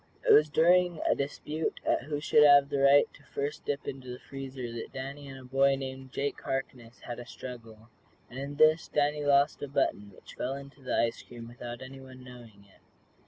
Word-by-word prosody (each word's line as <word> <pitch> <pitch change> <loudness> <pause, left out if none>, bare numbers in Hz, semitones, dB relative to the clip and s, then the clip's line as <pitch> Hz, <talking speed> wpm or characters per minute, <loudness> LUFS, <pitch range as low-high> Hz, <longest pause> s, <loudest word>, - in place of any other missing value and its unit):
It - - +8
was 150 0 +6
during 175 +2 +3
a - - +5
dispute 150 +3 -3
as - - +2
to - - -12
who 145 0 -3
should 150 0 +4
have 145 -1 +7
the 140 - -1
right 140 +1 +6
to - - -18
first 145 +2 -5
dip 145 0 -3
into 130 -1 -6
the 125 - -6
freezer 135 -3 -7
that 115 - -7
Danny 140 +2 -7
and 135 -1 -9
a - - -13
boy 135 +2 +3
named 130 -1 -7
Jake 140 +2 -3
Harkness 125 -3 -5
had 120 - -7
a 120 - -8
struggle, 115 -3 -10 0.4
and 130 - -9
in 140 +1 -5
this 155 +2 +4
Danny 150 0 0
lost 140 0 +3
a 145 - -3
button 135 -7 -1
which - - -15
fell 130 +2 -3
into 140 0 -11
the 130 - -2
ice 115 0 0
cream 120 -1 -11
without 120 +1 -8
anyone 130 -1 -11
knowing 120 -5 -14
it. 95 - -25
135 Hz, 210 wpm, -29 LUFS, 125-145 Hz, 0.4 s, It